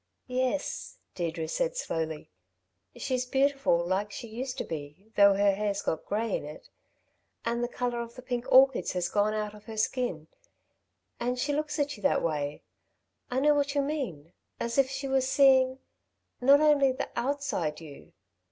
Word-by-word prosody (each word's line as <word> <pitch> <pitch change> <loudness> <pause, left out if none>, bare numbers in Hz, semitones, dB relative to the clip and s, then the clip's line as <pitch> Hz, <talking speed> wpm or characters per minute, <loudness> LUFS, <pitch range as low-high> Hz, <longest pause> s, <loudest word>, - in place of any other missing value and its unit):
"Yes," 255 +2 -2 0.2
Deirdre 165 -2 -3
said - - -1
slowly. 160 - -3 0.6
"She's 255 -1 -1
beautiful 270 -9 +2
like 195 +3 -1
she 235 - -7
used 250 +4 -5
to - - -2
be, 155 +7 -8
though 200 -1 +6
her 200 0 +4
hair's 200 0 -2
got 160 - -2
grey 215 +1 0
in - - -3
it... 150 +1 -10 0.8
and 235 +1 0
the - - +1
colour 245 -1 -2
of 235 0 -8
the 255 - -10
pink 245 -2 -4
orchids 265 0 +5
has 180 -1 0
gone 210 +1 +1
out 210 -1 -2
of 210 0 -14
her 225 -1 -8
skin. 215 -8 -1 0.9
And 245 +1 -1
she 285 +3 0
looks 300 +1 -2
at 290 -1 -1
you - - -14
that 280 - +2
way 150 -3 -2 0.7
I 255 0 0
know 295 +1 +5
what 285 0 0
you 285 - +2
mean 225 - -4 0.3
as 235 +3 -1
if 265 -1 +4
she 270 +1 -4
were 265 0 +2
seeing... 260 -1 +4 0.6
not 280 +3 +6
only 290 -3 +5
the 255 - -4
outside 235 - -1
you.... 150 -4 -12
240 Hz, 170 wpm, -29 LUFS, 195-270 Hz, 0.9 s, though